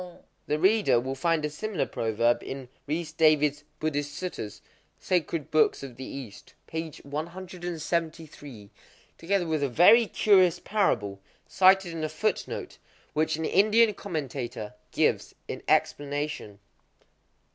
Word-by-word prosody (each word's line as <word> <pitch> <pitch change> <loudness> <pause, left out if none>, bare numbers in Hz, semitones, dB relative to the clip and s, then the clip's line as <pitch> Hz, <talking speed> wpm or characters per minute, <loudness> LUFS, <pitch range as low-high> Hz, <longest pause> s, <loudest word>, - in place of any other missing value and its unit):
—The 150 - +1
reader 195 - +4
will 130 +2 -3
find 160 +3 0
a - - -1
similar 200 +2 -2
proverb 115 +1 0
in 135 -2 -7 0.2
Rhys 155 +2 -2
David's 150 -2 +3 0.2
"Buddhist 145 -2 -2
Suttas" 175 - -6 0.4
(Sacred 170 -4 -1
Books 155 -2 +3
of 130 -3 -8
the 130 - -8
East), 130 -7 -9
p. 160 0 -4
173,—together 165 - -5
with 160 -2 -1
a 140 - +1
very 210 - +6
curious 185 -5 +4
parable, 110 - 0 0.3
cited 190 -1 +4
in 160 -1 -4
a 155 - -1
footnote, 185 +8 -3 0.3
which 155 +1 +1
an 160 +1 -3
Indian 215 +4 +4
commentator 135 - -5 0.2
gives - - 0
in - - -5
explanation. 145 -7 -1
155 Hz, 120 wpm, -27 LUFS, 140-180 Hz, 0.4 s, very